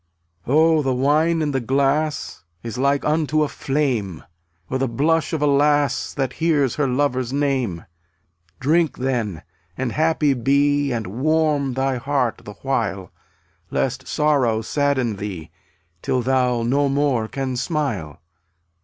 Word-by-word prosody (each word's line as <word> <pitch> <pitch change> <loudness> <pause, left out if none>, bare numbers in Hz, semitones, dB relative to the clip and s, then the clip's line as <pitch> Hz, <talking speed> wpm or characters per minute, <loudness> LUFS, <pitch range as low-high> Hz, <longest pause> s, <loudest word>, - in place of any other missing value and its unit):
27 155 +6 +4
1 - - +3
Oh, - - +2
the 135 -3 0
wine 155 +5 +2
in 150 - -1
the 135 - 0
glass 140 +1 0 0.2
Is 115 +1 -5
like 140 +1 +1
unto 155 0 +1
a - - 0
flame, 125 - -2 0.4
Or 130 - -2
the 135 - +1
blush 155 +7 +1
of 160 -3 -1
a - - +4
lass 145 -1 +2
That 135 -2 -1
hears 150 -6 +2
her 145 -2 +1
lover's 130 -2 0
name. 130 - -1 0.7
Drink, 160 +2 +2
then, 115 -10 -2 0.3
and 130 -2 -2
happy 155 -1 +2
be 140 +3 +2
_ - - -2
And 115 - -5 0.2
warm 155 -3 +1
thy 135 0 0
heart 130 -2 -1
the 105 - -8
while, 110 -8 -2 0.6
Lest 135 +1 -2
Sorrow 135 -8 +1
sadden 130 -4 0
thee,^ 90 -6 -6 0.5
Till 125 -1 0
thou 125 -2 +1
no 140 +4 +1
more 135 -5 +1
can 130 +1 -3
smile. 125 - -3
135 Hz, 145 wpm, -21 LUFS, 125-145 Hz, 0.7 s, 27